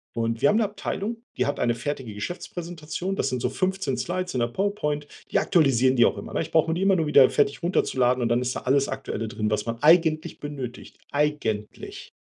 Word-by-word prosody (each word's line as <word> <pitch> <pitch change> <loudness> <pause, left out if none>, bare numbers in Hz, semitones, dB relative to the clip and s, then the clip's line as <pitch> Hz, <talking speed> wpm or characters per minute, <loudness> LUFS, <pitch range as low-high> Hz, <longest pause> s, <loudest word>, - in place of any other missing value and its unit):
Und 115 0 -1
wir 140 - +5
haben 210 - +3
'ne 230 - +3
Abteilung, 210 +2 -3 0.2
die - - +1
hat 145 - -2
eine 120 -1 +1
fertige 130 -4 -4
Geschäftspräsentation. 175 - -5
Das 140 - 0
sind 125 -1 -2
so 125 - 0
15 185 -5 -1
Slides 180 +8 -3
in 125 - +1
der 120 - +1
PowerPoint. 150 - -2 0.2
Die - - +2
aktualisieren 130 -7 +3
die 120 -2 +6
auch - - +1
immer, - - -8
ne? - - 0
Ich - - -5
brauche 165 0 +3
mir - - +1
die 175 - -2
immer 195 0 +4
nur 165 -3 +1
wieder 140 -3 +7
fertig 145 +1 +1
runterzuladen, 130 -8 +1
und 120 - 0
dann 120 +1 +2
ist 125 0 -2
da - - -4
alles 135 +2 +2
Aktuelle 135 -4 -4
drin, 105 0 -2
was 105 -1 0
man 115 0 -2
eigentlich 160 -1 +4
benötigt. 135 -4 -7
Eigentlich. 145 -8 -2
145 Hz, 220 wpm, -25 LUFS, 120-175 Hz, 0.2 s, wieder